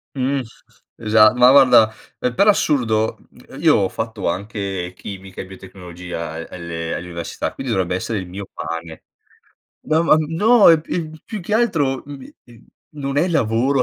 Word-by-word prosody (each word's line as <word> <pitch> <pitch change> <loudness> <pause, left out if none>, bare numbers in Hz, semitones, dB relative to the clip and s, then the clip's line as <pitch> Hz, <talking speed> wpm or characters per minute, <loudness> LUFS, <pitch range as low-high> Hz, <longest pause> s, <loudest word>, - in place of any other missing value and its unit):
Mh. 135 +1 0 0.5
Esa 110 0 +4
ma, 125 0 +6
guarda, 125 -5 +6 0.3
ehm, 125 -1 -2
per 200 - +3
assurdo, 120 - +2 0.4
io - - +4
ho 95 -2 +1
fatto 110 -4 -4
anche 95 -1 -4
chimica 95 -1 -9
e - - -8
biotecnologia 90 -3 -8
a - - -7 0.2
alle 85 -2 -5
all'università, 85 -1 -5
quindi 135 -3 -5
dovrebbe 90 -3 0
essere 105 +3 -3
il 90 - -7
mio 95 +2 -7
pane. 80 -1 -7 0.8
No, 155 +1 +1
ma 165 - +5
no 200 +9 +4
e 165 -2 +5
p 160 0 -4 0.2
più 215 -3 -6
che 210 +5 -3
altro, 160 - +1
mhmm, 140 -2 -11 0.6
non 140 -1 -4
è 160 +5 +2
lavoro, 130 -2 +1
115 Hz, 150 wpm, -20 LUFS, 95-145 Hz, 0.8 s, ma